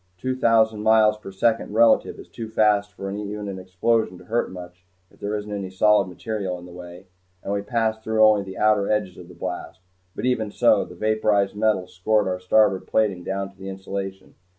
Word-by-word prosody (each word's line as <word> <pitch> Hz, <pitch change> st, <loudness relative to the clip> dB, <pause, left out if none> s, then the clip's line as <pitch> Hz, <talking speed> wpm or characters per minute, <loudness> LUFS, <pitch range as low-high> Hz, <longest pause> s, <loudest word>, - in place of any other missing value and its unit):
Two 130 Hz, +7 st, -2 dB
thousand 110 Hz, -3 st, +3 dB
miles 110 Hz, 0 st, +4 dB
per 105 Hz, -2 st, -10 dB
second 110 Hz, +2 st, 0 dB
relative 115 Hz, +1 st, +4 dB
is -, -, -12 dB
too 115 Hz, -1 st, -8 dB
fast 105 Hz, -2 st, +2 dB
for 95 Hz, -1 st, -6 dB
even 105 Hz, 0 st, -5 dB
an 95 Hz, -1 st, -5 dB
explosion 95 Hz, +2 st, 0 dB
to 90 Hz, -, -15 dB
hurt 115 Hz, +3 st, -1 dB
much 90 Hz, -1 st, -11 dB, 0.3 s
if -, -, -24 dB
there 105 Hz, +1 st, -3 dB
isn't 105 Hz, 0 st, -5 dB
any 100 Hz, -2 st, -4 dB
solid 105 Hz, +1 st, +3 dB
material 95 Hz, -1 st, -4 dB
in 90 Hz, -, -12 dB
the 90 Hz, -, -12 dB
way, 90 Hz, 0 st, -11 dB, 0.4 s
and 100 Hz, -, -3 dB
we 100 Hz, -, -1 dB
passed 110 Hz, 0 st, -1 dB
through 110 Hz, 0 st, +3 dB
only 105 Hz, -1 st, +4 dB
the 95 Hz, -1 st, -8 dB
outer 105 Hz, -1 st, +2 dB
edges 105 Hz, -4 st, -1 dB
of 90 Hz, -, -11 dB
the 90 Hz, -, -14 dB
blast, 90 Hz, +1 st, -6 dB, 0.4 s
but -, -, -4 dB
even 120 Hz, -4 st, 0 dB
so, 110 Hz, -1 st, +3 dB
the 90 Hz, -, -12 dB
vaporized 105 Hz, 0 st, +1 dB
metal 105 Hz, -3 st, +1 dB
scoured 105 Hz, +4 st, 0 dB
our 90 Hz, 0 st, -2 dB
starboard 95 Hz, +1 st, +2 dB
plating 100 Hz, -5 st, 0 dB
down 95 Hz, +1 st, -3 dB
to 95 Hz, -, -28 dB
the 95 Hz, 0 st, -7 dB
insulation. 95 Hz, 0 st, -6 dB
100 Hz, 205 wpm, -23 LUFS, 95-110 Hz, 0.4 s, miles